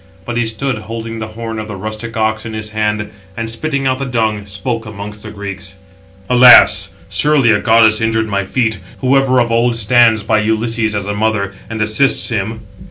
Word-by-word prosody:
But 120 Hz, -, -5 dB
he 120 Hz, -1 st, 0 dB
stood, 115 Hz, +1 st, -3 dB
holding 115 Hz, +1 st, -7 dB
the 110 Hz, -, -5 dB
horn 115 Hz, 0 st, -6 dB
of 110 Hz, -, -6 dB
the 105 Hz, -, -7 dB
rustic 110 Hz, +3 st, -6 dB
ox 110 Hz, 0 st, 0 dB
in 110 Hz, -, -7 dB
his 110 Hz, -1 st, -4 dB
hands; 105 Hz, -1 st, -2 dB, 0.3 s
and, 115 Hz, 0 st, -2 dB
spitting 140 Hz, +3 st, -2 dB
out 130 Hz, 0 st, 0 dB
the 135 Hz, -, -3 dB
dung, 110 Hz, -5 st, -2 dB
spoke 110 Hz, +3 st, -4 dB
amongst 105 Hz, 0 st, -8 dB
the -, -, -8 dB
Greeks: 100 Hz, -1 st, -8 dB, 0.5 s
"Alas! 125 Hz, 0 st, +6 dB, 0.2 s
surely 145 Hz, -6 st, +3 dB
a 105 Hz, -, +2 dB
goddess 110 Hz, 0 st, +4 dB
injured 110 Hz, 0 st, 0 dB
my 100 Hz, -1 st, -1 dB
feet, 110 Hz, 0 st, -1 dB, 0.2 s
who 130 Hz, +1 st, +2 dB
ever 135 Hz, -2 st, +3 dB
of 120 Hz, -1 st, 0 dB
old 120 Hz, +1 st, +2 dB
stands 115 Hz, -1 st, +3 dB
by 110 Hz, +1 st, +1 dB
Ulysses 110 Hz, 0 st, 0 dB
as 100 Hz, -1 st, -2 dB
a 105 Hz, -, -3 dB
mother, 105 Hz, -2 st, -1 dB, 0.2 s
and 115 Hz, 0 st, -5 dB
assists 110 Hz, +8 st, +2 dB
him." 110 Hz, 0 st, -3 dB
110 Hz, 195 wpm, -15 LUFS, 105-120 Hz, 0.5 s, Alas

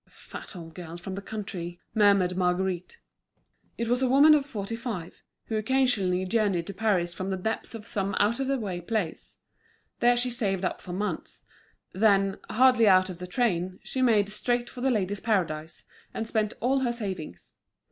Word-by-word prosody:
"The -, -, -30 dB
fat -, -, -10 dB
old 165 Hz, -2 st, -9 dB
girl 170 Hz, -1 st, -8 dB
from 190 Hz, +2 st, -7 dB
the 195 Hz, -, -5 dB
country," 190 Hz, -5 st, -6 dB
murmured 200 Hz, -4 st, +4 dB
Marguerite. 185 Hz, -, -1 dB, 0.8 s
It 235 Hz, -, -2 dB
was 245 Hz, +2 st, +1 dB
a 260 Hz, -, +2 dB
woman 285 Hz, +4 st, +7 dB
of 290 Hz, -2 st, +2 dB
forty 215 Hz, -3 st, -4 dB
five, 225 Hz, -8 st, -6 dB, 0.2 s
who 220 Hz, -, -2 dB
occasionally 215 Hz, -6 st, +2 dB
journeyed 195 Hz, -4 st, +1 dB
to 200 Hz, -, -6 dB
Paris 190 Hz, -4 st, +1 dB
from 185 Hz, +3 st, -4 dB
the 190 Hz, -, -1 dB
depths 220 Hz, +4 st, -3 dB
of 215 Hz, -2 st, -8 dB
some 195 Hz, -3 st, -2 dB
out 215 Hz, +4 st, +2 dB
of 270 Hz, -, -1 dB
the 275 Hz, 0 st, +1 dB
way 190 Hz, -7 st, -4 dB
place. 185 Hz, -3 st, -3 dB, 0.6 s
There 240 Hz, 0 st, +4 dB
she 245 Hz, +1 st, 0 dB
saved 195 Hz, -6 st, -1 dB
up -, -, -2 dB
for 180 Hz, -, -8 dB
months; 205 Hz, +4 st, -4 dB, 0.5 s
then, 195 Hz, -1 st, +3 dB
hardly 250 Hz, -1 st, +5 dB
out 185 Hz, -1 st, +5 dB
of 175 Hz, -, -10 dB
the 180 Hz, -, -6 dB
train, 185 Hz, -4 st, 0 dB
she 260 Hz, -, -3 dB
made 220 Hz, -5 st, +4 dB
straight 240 Hz, +3 st, 0 dB
for 250 Hz, -, -8 dB
The 265 Hz, -, +2 dB
Ladies' 205 Hz, -4 st, 0 dB
Paradise, 165 Hz, -8 st, -1 dB, 0.3 s
and 225 Hz, -, -2 dB
spent 215 Hz, -2 st, 0 dB
all 265 Hz, +3 st, +2 dB
her 250 Hz, -2 st, 0 dB
savings. 190 Hz, -, -5 dB
205 Hz, 185 wpm, -27 LUFS, 185-235 Hz, 0.8 s, woman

